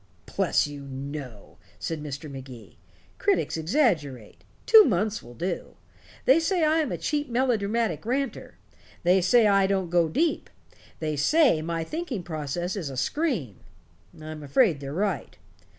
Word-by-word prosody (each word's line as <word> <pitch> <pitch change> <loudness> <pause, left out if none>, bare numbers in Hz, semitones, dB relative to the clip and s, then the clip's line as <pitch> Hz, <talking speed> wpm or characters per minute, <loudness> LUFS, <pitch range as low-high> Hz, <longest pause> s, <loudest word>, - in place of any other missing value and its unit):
"Bless - - +2
you, 145 -1 -8
no," 135 -4 -8 0.2
said 160 -2 -4
Mr. 150 +1 -6
Magee. 130 -4 -11 0.4
"Critics 400 -2 +1
exaggerate. 160 - -1 0.2
Two 445 -1 +9
months 215 - 0
will 120 +1 -13
do. 175 +7 -4 0.5
They 270 +5 +6
say 335 +1 +1
I 310 +1 +3
am 310 - -1
a - - -2
cheap 295 -2 -2
melodramatic 230 - 0
ranter. 265 +4 -3 0.5
They 180 +2 +4
say 225 +6 +4
I 195 -2 +4
don't 190 -3 -1
go 170 -2 +3
deep. 325 - 0 0.5
They 155 -1 -2
say 250 - +3
my 165 0 -2
thinking 295 - -4
process 170 +3 -3
is 175 -8 -4
a 135 - -7
scream. 195 - -1 0.6
I'm 155 0 -8
afraid 150 - +2
they're 140 -1 -6
right. 180 - -2
175 Hz, 145 wpm, -26 LUFS, 145-245 Hz, 0.6 s, Two